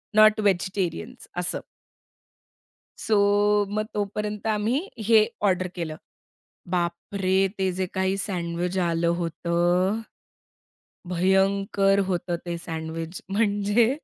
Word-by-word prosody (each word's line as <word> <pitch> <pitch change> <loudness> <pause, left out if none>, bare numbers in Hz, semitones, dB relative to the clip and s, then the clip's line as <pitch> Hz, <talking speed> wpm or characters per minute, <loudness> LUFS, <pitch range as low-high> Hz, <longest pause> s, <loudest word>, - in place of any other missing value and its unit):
Not 215 0 +7
vegetarians 195 +4 -1
असं. 180 0 0 1.5
So 220 - +3 0.6
मग 215 - 0
तोपर्यंत 210 +1 -3
आम्ही 215 +4 +1 0.3
हे 225 -1 +7 0.3
ऑर्डर 185 0 0
केलं. 160 -2 -4 0.8
बापरे! 185 +2 -1 0.2
ते 190 -1 +1
जे 185 - 0
काही 190 +1 +1
सँडविच 175 0 -2
आलं 170 0 +1
होतं. 175 +4 +1 1.2
भयंकर 195 +2 +3
होतं 175 0 -1
ते 170 -1 -3
सँडविच 160 +1 -5
म्हणजे 205 +2 +3
190 Hz, 95 wpm, -25 LUFS, 175-205 Hz, 1.5 s, Not